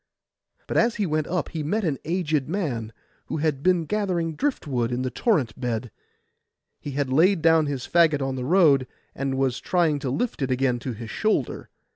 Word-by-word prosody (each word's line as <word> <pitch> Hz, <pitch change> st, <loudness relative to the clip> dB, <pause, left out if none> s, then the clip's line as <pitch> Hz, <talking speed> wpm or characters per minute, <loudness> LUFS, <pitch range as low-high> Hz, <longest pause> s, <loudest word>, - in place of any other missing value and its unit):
But -, -, -2 dB
as 235 Hz, 0 st, +3 dB
he 210 Hz, -, 0 dB
went 155 Hz, -2 st, -1 dB
up 175 Hz, -2 st, -2 dB
he 160 Hz, -, -4 dB
met 205 Hz, +9 st, -1 dB
an 150 Hz, -7 st, -1 dB
aged 155 Hz, -5 st, -1 dB
man, 135 Hz, -, -2 dB, 0.4 s
who -, -, -3 dB
had 150 Hz, -3 st, 0 dB
been 180 Hz, 0 st, +2 dB
gathering 180 Hz, -5 st, -1 dB
drift 275 Hz, -, -2 dB
wood 125 Hz, -4 st, -1 dB
in 125 Hz, +1 st, -1 dB
the 130 Hz, -, -2 dB
torrent 150 Hz, -, +1 dB
bed. 120 Hz, -2 st, -3 dB, 0.9 s
He 145 Hz, -, -6 dB
had 135 Hz, -2 st, -1 dB
laid 170 Hz, +3 st, +4 dB
down 160 Hz, -2 st, +5 dB
his 135 Hz, -3 st, -3 dB
faggot 155 Hz, -5 st, +3 dB
in 135 Hz, -, -2 dB
the 130 Hz, -1 st, -4 dB
road, 145 Hz, -4 st, +4 dB, 0.3 s
and 135 Hz, 0 st, -2 dB
was 130 Hz, -2 st, 0 dB
trying 165 Hz, -5 st, +1 dB
to 135 Hz, -, -3 dB
lift 225 Hz, -, -2 dB
it 135 Hz, -, 0 dB
again 125 Hz, -1 st, +1 dB
to 125 Hz, +1 st, -4 dB
his 115 Hz, 0 st, -8 dB
shoulder. 215 Hz, 0 st, -1 dB
150 Hz, 195 wpm, -25 LUFS, 130-175 Hz, 0.9 s, down